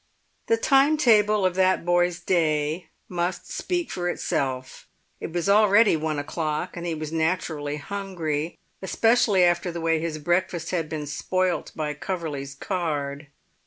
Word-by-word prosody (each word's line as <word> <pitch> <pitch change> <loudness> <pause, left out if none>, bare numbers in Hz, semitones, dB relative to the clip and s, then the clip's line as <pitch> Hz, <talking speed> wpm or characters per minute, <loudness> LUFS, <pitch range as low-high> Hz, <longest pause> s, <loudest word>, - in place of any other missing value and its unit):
The 230 - +3
time 275 +6 +4
table 215 -7 +4
of 185 - +2
that 185 -1 +2
boy's 175 0 +2
day 155 -1 0 0.2
must 175 0 -3
speak 355 -2 -2
for 175 -1 -2
itself. 130 -7 -3 0.3
It - - -6
was 175 +2 -2
already 205 0 +5
one 155 -1 -2
o'clock, 150 +1 -3
and 175 0 -5
he 165 - -1
was 155 0 -5
naturally 160 -3 -1
hungry, 170 -4 -3 0.2
especially 220 -1 +3
after 175 0 +2
the 170 - -5
way 165 -1 +1
his 160 -1 -3
breakfast 175 +1 -1
had 165 -4 -1
been 150 -1 -4
spoilt 185 +5 -1
by 150 -1 -2
Coverley's 150 -4 -4
card. 150 -4 -3
170 Hz, 145 wpm, -25 LUFS, 155-190 Hz, 0.3 s, already